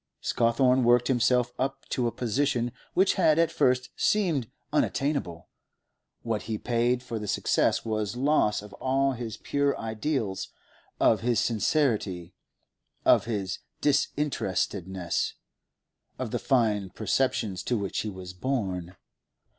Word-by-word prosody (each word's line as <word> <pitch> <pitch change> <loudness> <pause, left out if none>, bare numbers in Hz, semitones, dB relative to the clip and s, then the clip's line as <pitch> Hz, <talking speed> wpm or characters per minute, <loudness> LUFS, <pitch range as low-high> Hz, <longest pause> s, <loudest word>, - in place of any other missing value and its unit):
Scawthorne 125 +2 +2
worked 120 +1 +4
himself 125 -1 +2
up 135 +1 -2
to 125 -2 0
a - - -1
position 120 +1 0 0.2
which 190 +1 +4
had 160 -2 +5
at 165 0 +3
first 125 0 +1
seemed 170 - +1 0.2
unattainable; 135 - -1 0.8
what 115 -2 -1
he 110 - -1
paid 120 +2 0
for 115 -3 -4
the 105 - -6
success 105 - +1
was 110 -1 -2
loss 130 -6 +2
of 105 - -12
all 135 +1 +2
his 120 -4 -5
pure 140 0 0
ideals, 110 -2 -2 0.5
of 110 - +4
his 120 0 +2
sincerity, 110 - 0 0.7
of - - +5
his 100 -5 -3 0.2
disinterestedness, 95 - -1 0.8
of - - -4
the - - -1
fine 105 -7 +1
perceptions 110 -2 0
to 120 - -1
which 100 -3 -2
he 110 - -2
was 95 -2 -8
born. 95 -6 -3
120 Hz, 125 wpm, -27 LUFS, 105-135 Hz, 0.8 s, had